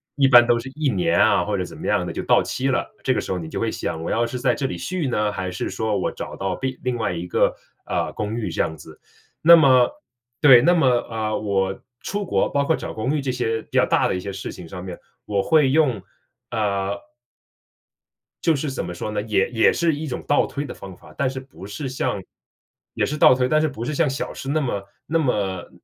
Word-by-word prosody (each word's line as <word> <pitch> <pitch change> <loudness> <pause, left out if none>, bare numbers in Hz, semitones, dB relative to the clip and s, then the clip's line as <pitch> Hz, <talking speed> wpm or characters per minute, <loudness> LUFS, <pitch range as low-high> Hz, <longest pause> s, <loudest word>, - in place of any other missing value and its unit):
一 140 -2 +4
般 120 -2 +8
都 120 0 +3
是 135 - -7
1 150 -2 0
年 90 -6 +1
啊， 100 -4 +4
或 105 - -1
者 90 - -1
怎 90 - -10
么 - - -8
样 - - +1
的 - - -4
就 - - -4
到 - - +4
期 130 - -2
了。 130 - -1
这 130 - +3
个 - - -1
时 - - -6
候 95 - -1
你 80 - -6
就 - - -6
会 - - 0
想 80 0 -4
我 - - -3
要 120 +1 +2
是 125 - -5
在 125 0 +2
这 140 - -3
里 130 - -2
续 180 -6 -3
呢？ 105 -4 0
还 95 -2 -4
是 90 - -3
说 110 -2 -1
我 95 - -1
找 - - -7
到 95 -2 -3
另 130 -1 -2
另 125 -1 -1
外 110 -6 -1
一 85 0 -4
个 - - +2 0.3
呃， - - -1
公 105 +1 -3
寓 115 -5 -3
这 80 - -6
样 80 - -2
子。 75 - -14 0.4
那 170 +2 +10
么 130 -6 +6 0.5
对， 135 -5 +9
那 175 +4 +5
么 160 -6 +3
呃， 115 -3 0
我 95 -2 -1 0.2
出 205 +1 -3
国 - - +1
包 140 - +1
括 160 - +2
找 - - -6
公 125 +7 -1
寓 - - -2
这 135 -1 -1
些 115 -3 -1
比 - - -29
较 - - +6
大 - - +2
的 - - -1
一 - - -2
些 100 +2 -5
事 95 - -6
情 90 - -10
上 90 +2 -8
面， 90 -2 -7 0.3
我 100 -2 0
会 155 -4 +4
用， 145 -5 +3 0.5
啊 100 -4 -1 1.5
就 165 -2 +3
是 140 +1 -3
怎 135 - -3
么 - - -5
说 95 - -4
呢， 105 -1 -2
也 105 -3 +1
也 115 -2 +4
是 170 -2 +1
一 155 +2 -5
种 130 - -4
倒 145 - +3
推 140 0 -4
的 - - -6
方 95 -2 -10
法， - - -17
但 135 - +1
是 130 0 -5
不 130 -8 -12
是 105 +8 -5
像 115 -6 -2 0.7
也 - - +1
是 150 - -2
倒 130 - +7
推， 125 0 +1
但 155 +2 +3
是 155 - +2
不 120 -5 -6
是 150 - -3
像 155 +1 +2
小 135 +1 -3
事 135 - -8
那 155 +3 +1
么 120 -8 -2 0.2
那 165 - +1
么 100 - -1
120 Hz, 265 characters per minute, -22 LUFS, 100-140 Hz, 1.5 s, 那